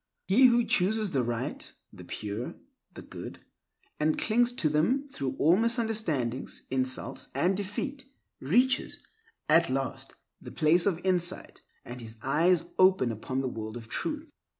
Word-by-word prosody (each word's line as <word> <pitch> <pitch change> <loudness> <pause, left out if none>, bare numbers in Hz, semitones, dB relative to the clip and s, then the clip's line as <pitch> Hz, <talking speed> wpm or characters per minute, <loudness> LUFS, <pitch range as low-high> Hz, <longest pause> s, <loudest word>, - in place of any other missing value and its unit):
He 250 +7 +6
who 240 -1 +4
chooses 205 +2 +1
the 135 - +1
right, 120 -1 -4 0.2
the - - -11
pure, 105 +3 -5 0.4
the - - -9
good, - - -9 0.6
and 155 +1 +1
clings 240 +2 +2
to 180 - +1
them 200 - +1
through 135 - -4
all 165 +4 +5
misunderstandings, 220 - -1
insults, 130 0 -2
and 175 +8 +2
defeat, 255 +8 -4 0.3
reaches, 250 - +2 0.5
at 165 +1 +5
last, 135 +1 -3 0.3
the - - -9
place 165 +5 +3
of 180 -2 -1
insight, 180 -1 0 0.2
and 125 +1 -8
his 115 0 -9
eyes 165 +6 +2
open 185 -10 +5
upon 130 +4 -3
the 135 - -2
world 110 -2 -5
of 115 -2 -11
truth. 305 -1 -3
170 Hz, 145 wpm, -29 LUFS, 130-220 Hz, 0.6 s, He